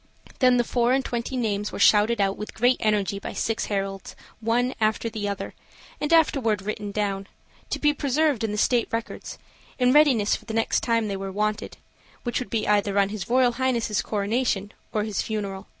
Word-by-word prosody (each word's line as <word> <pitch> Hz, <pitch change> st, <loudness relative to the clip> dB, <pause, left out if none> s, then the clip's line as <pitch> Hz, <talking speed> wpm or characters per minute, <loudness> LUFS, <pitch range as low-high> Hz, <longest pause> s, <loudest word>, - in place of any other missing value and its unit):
Then 255 Hz, -2 st, +5 dB
the 240 Hz, -, +3 dB
four 240 Hz, +1 st, +1 dB
and 265 Hz, 0 st, +1 dB
twenty 240 Hz, +2 st, -3 dB
names 210 Hz, -3 st, -1 dB
were -, -, -6 dB
shouted 215 Hz, +2 st, +4 dB
out 195 Hz, -1 st, +2 dB
with 210 Hz, -, -8 dB
great 245 Hz, +3 st, +3 dB
energy 205 Hz, -3 st, 0 dB
by -, -, -6 dB
six 225 Hz, 0 st, -1 dB
heralds, 195 Hz, -1 st, -4 dB, 0.2 s
one 240 Hz, +3 st, +1 dB
after 220 Hz, +1 st, +1 dB
the 205 Hz, -2 st, -3 dB
other, 200 Hz, -, -5 dB, 0.5 s
and 295 Hz, -, -2 dB
afterward 265 Hz, -, +3 dB
written 210 Hz, 0 st, -4 dB
down, 200 Hz, -1 st, -2 dB, 0.4 s
to -, -, -1 dB
be 295 Hz, -1 st, +2 dB
preserved 285 Hz, -3 st, +1 dB
in 220 Hz, -, 0 dB
the 210 Hz, -, -3 dB
state 240 Hz, +2 st, +2 dB
records, 230 Hz, 0 st, -5 dB, 0.4 s
in 250 Hz, 0 st, +3 dB
readiness 270 Hz, -9 st, +4 dB
for -, -, -11 dB
the 220 Hz, -1 st, -5 dB
next 225 Hz, -, +2 dB
time 230 Hz, -2 st, 0 dB
they 200 Hz, -1 st, -3 dB
were 195 Hz, 0 st, -5 dB
wanted, 210 Hz, +2 st, -2 dB, 0.5 s
which 240 Hz, -, -1 dB
would 250 Hz, -, -6 dB
be 225 Hz, -2 st, -1 dB
either 205 Hz, -1 st, +2 dB
on 200 Hz, -1 st, +3 dB
his 210 Hz, -2 st, -6 dB
Royal 250 Hz, 0 st, +4 dB
Highness' 235 Hz, -4 st, 0 dB
coronation 210 Hz, -1 st, -1 dB, 0.2 s
or 210 Hz, -, 0 dB
his 215 Hz, -2 st, -2 dB
funeral. 200 Hz, -3 st, -4 dB
220 Hz, 195 wpm, -25 LUFS, 205-245 Hz, 0.5 s, Then